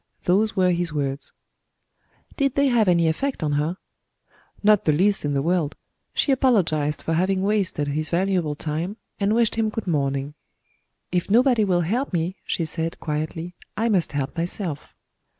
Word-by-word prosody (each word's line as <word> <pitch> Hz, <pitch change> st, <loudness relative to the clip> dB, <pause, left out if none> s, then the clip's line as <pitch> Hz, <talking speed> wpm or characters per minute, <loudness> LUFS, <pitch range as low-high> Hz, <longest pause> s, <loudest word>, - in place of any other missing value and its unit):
Those 205 Hz, +5 st, +2 dB
were 185 Hz, -2 st, +3 dB
his 175 Hz, -1 st, 0 dB
words." 140 Hz, -2 st, -2 dB, 1.0 s
"Did 275 Hz, -2 st, 0 dB
they 280 Hz, -1 st, +3 dB
have 230 Hz, -4 st, +3 dB
any 170 Hz, -2 st, +4 dB
effect 255 Hz, -, -1 dB
on 150 Hz, -, 0 dB
her?" 150 Hz, +5 st, 0 dB, 0.9 s
"Not 210 Hz, -1 st, +4 dB
the 155 Hz, -, +4 dB
least 195 Hz, +7 st, +2 dB
in 145 Hz, -1 st, 0 dB
the 135 Hz, -, +1 dB
world. 170 Hz, -3 st, 0 dB, 0.4 s
She 285 Hz, -, +2 dB
apologized 175 Hz, -, +2 dB
for 165 Hz, -, -1 dB
having 185 Hz, +3 st, +1 dB
wasted 195 Hz, -8 st, 0 dB
his 155 Hz, +2 st, -2 dB
valuable 175 Hz, -4 st, 0 dB
time, 160 Hz, +7 st, -3 dB, 0.2 s
and 205 Hz, +1 st, +2 dB
wished 230 Hz, -2 st, +3 dB
him 220 Hz, -1 st, +2 dB
good 220 Hz, 0 st, -4 dB
morning. 140 Hz, -4 st, -1 dB, 0.8 s
'If 180 Hz, +1 st, -1 dB
nobody 240 Hz, +1 st, +4 dB
will 180 Hz, -3 st, +2 dB
help 225 Hz, -, -1 dB
me,' 175 Hz, +2 st, -1 dB
she 165 Hz, -, -1 dB
said, 165 Hz, +1 st, -3 dB
quietly, 160 Hz, +3 st, -3 dB, 0.2 s
'I 230 Hz, +2 st, +1 dB
must 185 Hz, -8 st, +1 dB
help 140 Hz, -1 st, -2 dB
myself.' 170 Hz, -2 st, -4 dB
175 Hz, 165 wpm, -23 LUFS, 155-210 Hz, 1.0 s, any